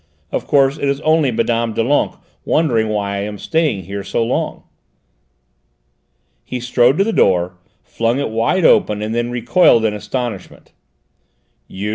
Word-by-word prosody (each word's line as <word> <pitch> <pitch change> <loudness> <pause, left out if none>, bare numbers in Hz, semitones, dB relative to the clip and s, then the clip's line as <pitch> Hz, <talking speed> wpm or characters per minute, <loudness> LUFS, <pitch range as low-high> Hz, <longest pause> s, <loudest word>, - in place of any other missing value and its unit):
Of - - -3
course 140 0 +2
it - - -2
is 140 0 -1
only 155 -2 +2
Mme. 115 0 0
Doulenques, 130 +6 0 0.3
wondering 120 -9 +1
why 100 -2 -2
I - - -2
am 105 +1 -5
staying 150 - -1
here 100 +3 -6
so 100 +4 -1
long." 120 - -3 1.8
He 125 - -5
strode 125 +3 +2
to 195 - +4
the 225 +2 -2
door, 90 - +2 0.3
flung 115 +3 -1
it 140 - -2
wide 115 +11 +1
open, 105 0 +3
and 110 +1 -3
then 120 +1 -1
recoiled 120 0 +3
in 105 - +1
astonishment. 105 -1 -6 1.0
"You?" 100 +2 -5
115 Hz, 150 wpm, -17 LUFS, 105-140 Hz, 1.8 s, to